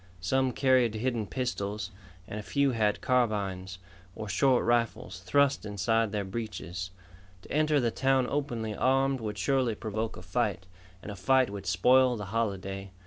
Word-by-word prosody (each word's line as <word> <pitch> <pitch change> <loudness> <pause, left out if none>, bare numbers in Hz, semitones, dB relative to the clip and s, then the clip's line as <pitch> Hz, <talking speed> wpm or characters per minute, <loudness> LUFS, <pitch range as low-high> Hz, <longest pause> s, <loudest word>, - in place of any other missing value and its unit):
Some 130 +9 +1
carried 125 -3 +3
hidden 115 -2 -1
pistols, 105 -5 -3 0.4
and 105 - -5
a - - -4
few 140 +5 +1
had 110 -3 +1
carbines, 100 -7 0 0.4
or 110 - -6
short 130 +4 +3
rifles, 115 -5 0
thrust 140 +9 +2
inside 105 +2 0
their 105 -1 -1
breeches. 95 -4 -5 0.5
To - - -14
enter 155 0 +3
the 120 -3 +1
town 135 0 +2
openly 120 -7 -2
armed 135 +1 +2
would 105 -2 -4
surely 125 +1 +1
provoke 110 +1 -4
a 90 - -10
fight, 100 -1 -1 0.4
and 105 - -6
a - - -7
fight 130 +5 +3
would 100 -3 -7
spoil 125 +8 +4
the 105 -3 -5
holiday. 95 -3 -2
115 Hz, 155 wpm, -29 LUFS, 100-130 Hz, 0.5 s, spoil